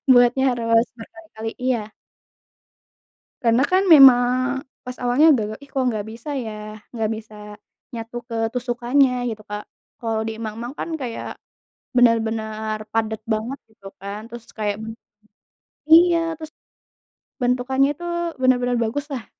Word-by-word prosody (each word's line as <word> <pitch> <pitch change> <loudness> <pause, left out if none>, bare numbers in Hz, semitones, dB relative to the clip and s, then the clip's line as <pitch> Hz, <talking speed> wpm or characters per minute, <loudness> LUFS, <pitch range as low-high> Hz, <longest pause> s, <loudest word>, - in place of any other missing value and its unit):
buatnya 245 +2 +5
harus 230 -1 +2
berkali-kali 225 -2 -8
iya. 230 -4 -1 1.5
Karena 235 +1 +3
kan 375 +6 +2
memang 255 -3 +6 0.2
pas 250 0 -8
awalnya 255 +6 +5
gagal, 215 -6 0
"ih 280 - -16
kok 270 - -2
nggak 215 -4 -1
bisa 235 +6 -6
ya?" 215 -4 -6 0.2
Nggak 225 -3 -2
bisa 215 -1 -11 0.6
nyatu 230 +1 -6
ke 230 - -6 0.2
tusukannya 245 0 +1
gitu 215 -1 -7
Kak, 210 0 -5 0.3
kalo 225 -1 -2
di 225 - -4
mang-mang 230 +5 -6
kan - - -5
kayak 245 -4 -6 0.6
bener-bener 220 -2 +1
padat 220 0 -1
banget 225 +5 -2
gitu 200 -3 -14
kan, 200 +2 -6
terus 235 0 -11
kayak 210 -1 -2 1.1
iya, 330 0 +5
terus 315 0 -9 0.9
bentukannya 255 +2 +2
itu 345 - -8 0.4
bener-bener 250 -1 +2
baguslah, 265 +2 -3
240 Hz, 125 wpm, -22 LUFS, 220-265 Hz, 1.5 s, memang